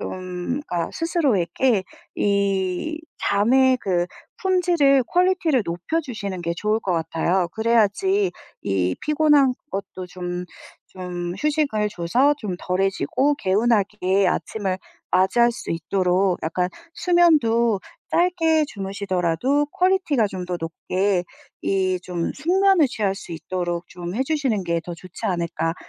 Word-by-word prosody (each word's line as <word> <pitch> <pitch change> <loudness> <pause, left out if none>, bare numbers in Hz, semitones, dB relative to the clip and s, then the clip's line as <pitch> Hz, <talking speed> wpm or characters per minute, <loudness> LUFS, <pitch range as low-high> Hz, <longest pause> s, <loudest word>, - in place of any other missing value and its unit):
좀 185 +8 -4
그러니까 170 -1 -2
스스로에게 260 - +1 0.3
이 200 - 0 0.2
잠에 255 +6 +3
그 175 -2 0 0.3
품질을 345 -8 +3
퀄리티를 355 - +2
높여주시는 200 - -3
게 170 0 -2
좋을 215 +3 +1
것 195 -5 -2
같아요. 170 +2 0 0.2
그래야지 235 - +2 0.3
이 90 -2 0
피곤한 295 -4 +3 0.2
것도 190 -2 -5
좀 180 0 -5 0.5
좀 180 -1 -5
휴식을 285 -9 0
줘서 235 +11 +2
좀 190 -5 -4
덜해지고 195 +9 0
개운하게 200 -3 +1
아침을 190 -3 -1 0.3
맞이할 235 +6 +3
수 - - -7
있도록 180 +2 +1
약간 180 +3 -1 0.2
수면도 235 - +3 0.3
짧게 330 -3 +3
주무시더라도 195 - -1
퀄리티가 365 - +2
좀 185 -2 -6
더 180 -1 -2
높게 180 +3 -1 0.4
이 185 -1 0
좀 175 -2 -2
숙면을 365 +1 +3
취할 205 -5 -1
수 175 - -9
있도록 175 0 -3
좀 175 +1 -7
해주시는 265 -5 0
게 170 -1 0
더 175 0 -6
좋지 180 +1 -8
않을까 170 -2 -1
200 Hz, 260 characters per minute, -23 LUFS, 180-280 Hz, 0.5 s, 잠에